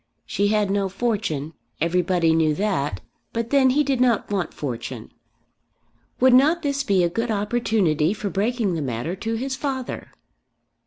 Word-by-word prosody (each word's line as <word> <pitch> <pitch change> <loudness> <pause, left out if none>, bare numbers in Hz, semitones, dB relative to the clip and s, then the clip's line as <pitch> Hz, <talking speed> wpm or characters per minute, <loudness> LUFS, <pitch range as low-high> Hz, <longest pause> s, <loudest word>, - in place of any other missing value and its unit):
She 200 +1 0
had 210 -1 +1
no 200 -1 0
fortune; 195 - -2 0.3
everybody 170 0 +2
knew 160 -2 +2
that; 145 - -1 0.3
but 230 0 -3
then 275 -2 +5
he 290 +4 +3
did 270 -3 0
not 235 -5 +2
want 190 -6 -1
fortune. 125 -6 -6 1.1
Would 260 0 +5
not 310 +7 +4
this 280 -1 0
be 195 -7 +2
a - - +3
good 230 +8 -2
opportunity 205 -7 +1
for 205 -1 -3
breaking 210 +1 0
the 165 - -2
matter 130 +6 -3
to 225 +4 -3
his 260 +3 -3
father? 265 -2 -4
205 Hz, 155 wpm, -23 LUFS, 170-245 Hz, 1.1 s, then